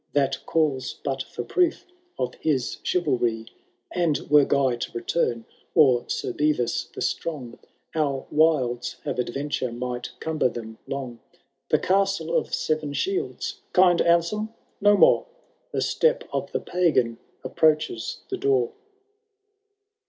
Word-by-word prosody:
That 135 Hz, -1 st, +1 dB
calls 140 Hz, -6 st, 0 dB
but 135 Hz, -1 st, -1 dB
for 120 Hz, -, -6 dB
proof 345 Hz, -, +1 dB, 0.3 s
of 125 Hz, -, -2 dB
his 135 Hz, -6 st, 0 dB
chivalry; 120 Hz, -10 st, 0 dB, 0.5 s
And 170 Hz, -4 st, +1 dB
were 145 Hz, -2 st, +7 dB
Guy 130 Hz, -4 st, +2 dB
to -, -, -4 dB
return, 120 Hz, -2 st, -1 dB, 0.3 s
or 130 Hz, -7 st, +5 dB
Sir -, -, -2 dB
fievis 150 Hz, -5 st, 0 dB
the -, -, -7 dB
Strong, 130 Hz, -8 st, -3 dB, 0.3 s
Our 145 Hz, -4 st, 0 dB
wilds 140 Hz, -6 st, +2 dB
have -, -, -3 dB
adventure 130 Hz, 0 st, -2 dB
might 125 Hz, +1 st, -4 dB
cumber 155 Hz, -5 st, +1 dB
them 110 Hz, -2 st, -8 dB
long 130 Hz, -4 st, -5 dB, 0.3 s
— -, -, -52 dB
The -, -, +5 dB
Castle 195 Hz, -3 st, +1 dB
of -, -, 0 dB
Seven 155 Hz, -2 st, -1 dB
Shields 390 Hz, -, -2 dB
Kind 180 Hz, -2 st, +5 dB
Anselm 170 Hz, +6 st, +2 dB, 0.3 s
no 205 Hz, 0 st, +6 dB
more! 350 Hz, -, +5 dB, 0.4 s
The -, -, -1 dB
step 485 Hz, +1 st, +2 dB
of -, -, -2 dB
the -, -, -1 dB
Pagan 130 Hz, -10 st, +1 dB, 0.2 s
approaches 155 Hz, -, +1 dB
the 385 Hz, -, -1 dB
door. 410 Hz, +3 st, +2 dB
150 Hz, 130 wpm, -25 LUFS, 125-175 Hz, 0.5 s, were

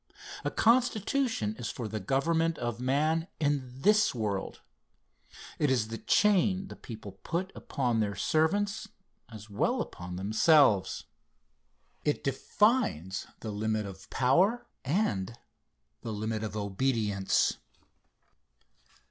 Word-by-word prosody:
A -, -, 0 dB
constitution 235 Hz, -, +1 dB
is 120 Hz, -, -3 dB
for 120 Hz, -, -5 dB
the 110 Hz, +1 st, -4 dB
government 160 Hz, -, +1 dB
of 120 Hz, -1 st, -3 dB
man 155 Hz, +6 st, +1 dB
in 145 Hz, -4 st, 0 dB
this 210 Hz, -4 st, +4 dB
world. 105 Hz, -4 st, -3 dB, 1.0 s
It 150 Hz, -, +2 dB
is 120 Hz, -4 st, +1 dB
the 115 Hz, -, -5 dB
chain 195 Hz, -2 st, +2 dB
the -, -, -8 dB
people 105 Hz, -4 st, -10 dB
put 185 Hz, +4 st, -2 dB
upon 120 Hz, -4 st, -1 dB
their 100 Hz, -2 st, 0 dB
servants, 200 Hz, -, +1 dB, 0.4 s
as 110 Hz, -1 st, -10 dB
well 100 Hz, -, 0 dB
as -, -, 0 dB
upon 90 Hz, +1 st, -8 dB
themselves. 110 Hz, -, +3 dB, 1.0 s
It 150 Hz, -, 0 dB
defines 135 Hz, -, +1 dB
the 110 Hz, -, -4 dB
limit 110 Hz, +1 st, -1 dB
of 95 Hz, -1 st, -10 dB
power 180 Hz, -, +2 dB, 0.2 s
and 120 Hz, -, -1 dB, 0.6 s
the 115 Hz, -, -5 dB
limit 110 Hz, +1 st, -3 dB
of 110 Hz, -1 st, -4 dB
obedience. 105 Hz, -1 st, +1 dB
125 Hz, 115 wpm, -30 LUFS, 105-170 Hz, 1.0 s, this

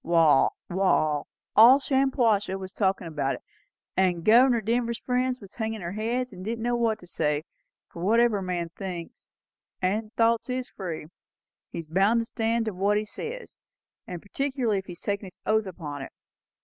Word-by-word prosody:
Wall, 165 Hz, -4 st, +5 dB, 0.2 s
all 175 Hz, -5 st, +1 dB, 0.5 s
Shampuashuh 250 Hz, -8 st, +1 dB
was 190 Hz, 0 st, -8 dB
talkin' 190 Hz, -3 st, 0 dB
about 145 Hz, -4 st, -1 dB
it, -, -, -12 dB, 0.5 s
and 180 Hz, -3 st, +1 dB
Governor 240 Hz, +2 st, +6 dB
Denver's 235 Hz, +2 st, 0 dB
friends 255 Hz, +1 st, -1 dB
was 200 Hz, -2 st, -13 dB
hangin' 220 Hz, -2 st, -3 dB
their 170 Hz, 0 st, -4 dB
heads, 235 Hz, +4 st, -2 dB
and 185 Hz, 0 st, -9 dB
didn't 225 Hz, +2 st, -3 dB
know 240 Hz, 0 st, +1 dB
what 230 Hz, -2 st, +1 dB
to -, -, -12 dB
say; 150 Hz, -3 st, -1 dB, 0.4 s
for 170 Hz, -, -10 dB
whatever 225 Hz, +2 st, +3 dB
a -, -, -5 dB
man 175 Hz, -2 st, -2 dB
thinks, 175 Hz, -1 st, -8 dB, 0.5 s
and 210 Hz, +4 st, -1 dB
thoughts 230 Hz, +1 st, +2 dB
is 250 Hz, 0 st, -3 dB
free, 170 Hz, -6 st, -6 dB, 0.7 s
he's 165 Hz, -, -5 dB
bound 195 Hz, +8 st, +3 dB
to -, -, -4 dB
stand 230 Hz, 0 st, -1 dB
to 215 Hz, -, -2 dB
what 200 Hz, +3 st, +1 dB
he 210 Hz, -, -1 dB
says, 470 Hz, -, -8 dB, 0.5 s
and 175 Hz, -2 st, -7 dB
particularly 250 Hz, -1 st, -1 dB
if 190 Hz, -, -11 dB
he 180 Hz, -, -6 dB
has 175 Hz, -, -11 dB
taken 200 Hz, 0 st, -2 dB
his 185 Hz, -, -14 dB
oath 220 Hz, -1 st, +2 dB
upon 150 Hz, -6 st, -6 dB
it. 135 Hz, -, -7 dB
205 Hz, 175 wpm, -26 LUFS, 180-235 Hz, 0.7 s, Governor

